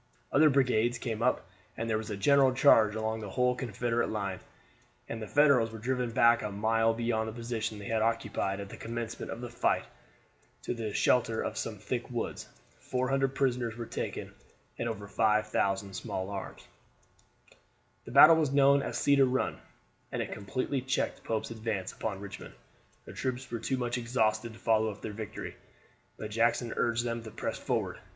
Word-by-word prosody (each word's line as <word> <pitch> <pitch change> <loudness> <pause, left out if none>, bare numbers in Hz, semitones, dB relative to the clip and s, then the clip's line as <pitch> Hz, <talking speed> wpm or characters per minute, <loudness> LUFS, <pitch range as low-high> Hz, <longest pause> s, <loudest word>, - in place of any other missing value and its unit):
Other 155 +2 +6
brigades 125 -4 +2
came 115 -2 -4
up, 125 +1 +1 0.3
and 115 - -2
there 110 -1 +1
was 110 - -7
a 105 - -3
general 135 +5 +5
charge 110 -6 +5
along 110 0 -2
the 105 -2 -6
whole 125 +5 +2
Confederate 120 -1 -1
line, 100 -3 -3 0.7
and 115 -1 -5
the 110 - -5
Federals 140 -6 +4
were 110 - -7
driven 125 +2 -1
back 115 +1 +4
a 105 - -3
mile 115 +2 +2
beyond 115 -1 -1
the - - -7
position 115 -2 -3
they 100 - -8
had 110 +1 0
occupied 110 -3 0
at 100 -1 -6
the - - -9
commencement 115 0 -5
of 115 - -6
the 120 - -5
fight 120 - +1 0.8
to - - -2
the 115 -3 -4
shelter 115 0 +2
of - - -3
some - - -4
thick - - -4
woods. - - -4 0.3
Four 130 0 -2
hundred 135 0 +1
prisoners 125 -4 0
were 120 - -4
taken - - -5 0.4
and 120 - -2
over 105 -3 -5
5,000 105 -2 +1
small 95 +1 -4
arms. 100 -1 -7 1.4
The - - -8
battle 150 +5 +9
was 155 -4 +1
known 140 0 +5
as - - -3
Cedar 140 -1 +4
Run, 130 0 -1 0.5
and - - -3
it - - -3
completely 130 +6 -2
checked 130 +1 -2
Pope's 110 0 -2
advance 110 -4 -3
upon 100 -3 -4
Richmond. 100 -1 -9 0.5
The - - -10
troops 130 0 -4
were 115 - -2
too 130 +4 -1
much 120 0 -1
exhausted 115 -2 0
to 110 - -14
follow 110 -1 +2
up 105 - -9
their 105 - -4
victory, 110 0 -7 0.6
but 110 0 -6
Jackson 115 +1 +1
urged 120 0 +1
them 115 -1 -2
to 110 - -9
press - - -4
forward. - - -2
115 Hz, 180 wpm, -30 LUFS, 110-125 Hz, 1.4 s, battle